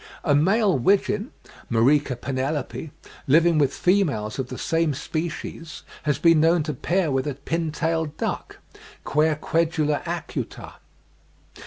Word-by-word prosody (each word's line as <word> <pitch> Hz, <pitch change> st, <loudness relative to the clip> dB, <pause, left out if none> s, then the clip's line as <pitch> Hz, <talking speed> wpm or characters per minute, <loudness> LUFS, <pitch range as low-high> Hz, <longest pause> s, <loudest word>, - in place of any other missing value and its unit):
A 150 Hz, -, +2 dB
male 190 Hz, -, +3 dB
wigeon 200 Hz, -, +1 dB, 0.4 s
(Mareca 130 Hz, +4 st, +3 dB
penelope), 140 Hz, +4 st, -3 dB, 0.4 s
living 165 Hz, +3 st, +4 dB
with 140 Hz, -2 st, +3 dB
females 145 Hz, -, 0 dB
of 130 Hz, -, -2 dB
the 130 Hz, -, -6 dB
same 165 Hz, -3 st, 0 dB
species, 160 Hz, +2 st, -5 dB, 0.3 s
has 145 Hz, -, +2 dB
been 165 Hz, -2 st, +5 dB
known 165 Hz, +1 st, +3 dB
to 150 Hz, 0 st, -3 dB
pair 170 Hz, +4 st, 0 dB
with 135 Hz, +1 st, 0 dB
a 145 Hz, -, -2 dB
pintail 160 Hz, +2 st, -1 dB
duck, -, -, -4 dB, 0.5 s
Querquedula 155 Hz, 0 st, +1 dB
acuta. -, -, -5 dB
155 Hz, 120 wpm, -24 LUFS, 140-165 Hz, 0.5 s, been